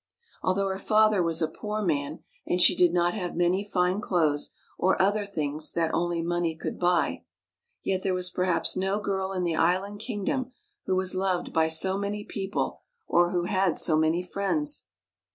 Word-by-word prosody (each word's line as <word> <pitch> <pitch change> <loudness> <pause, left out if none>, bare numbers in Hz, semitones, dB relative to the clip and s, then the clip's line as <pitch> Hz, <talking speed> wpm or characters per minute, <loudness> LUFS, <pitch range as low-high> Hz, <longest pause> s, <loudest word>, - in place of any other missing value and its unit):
Although 195 +1 0
her 190 0 -3
father 215 -1 +3
was 165 -1 +1
a - - +2
poor 210 +6 -5
man, 150 -3 -2 0.2
and 180 - 0
she - - +6
did 180 -2 +4
not 175 0 +1
have 180 -5 -4
many 175 +3 +1
fine 185 -1 0
clothes 155 -7 +1 0.3
or 190 +1 +2
other 205 +2 +2
things 155 -6 -2
that 165 -1 0
only 170 -1 -1
money 170 -1 -1
could - - -5
buy, 175 -1 +1 0.6
yet 190 -1 -1
there 190 -1 -1
was 180 0 0
perhaps 180 -1 +2
no 195 +2 -1
girl 195 -2 -2
in 185 -2 -2
the 170 -2 0
island 185 +6 0
kingdom 245 +3 -3 0.3
who 185 - +1
was 185 0 +1
loved 185 -1 -1
by 160 -1 +3
so 190 +5 +3
many 205 +1 -3
people, 195 0 -4 0.3
or 175 0 +3
who 175 -1 -1
had 185 -1 0
so 160 - +5
many 160 +3 +1
friends. 285 - -1
185 Hz, 180 wpm, -26 LUFS, 170-195 Hz, 0.6 s, she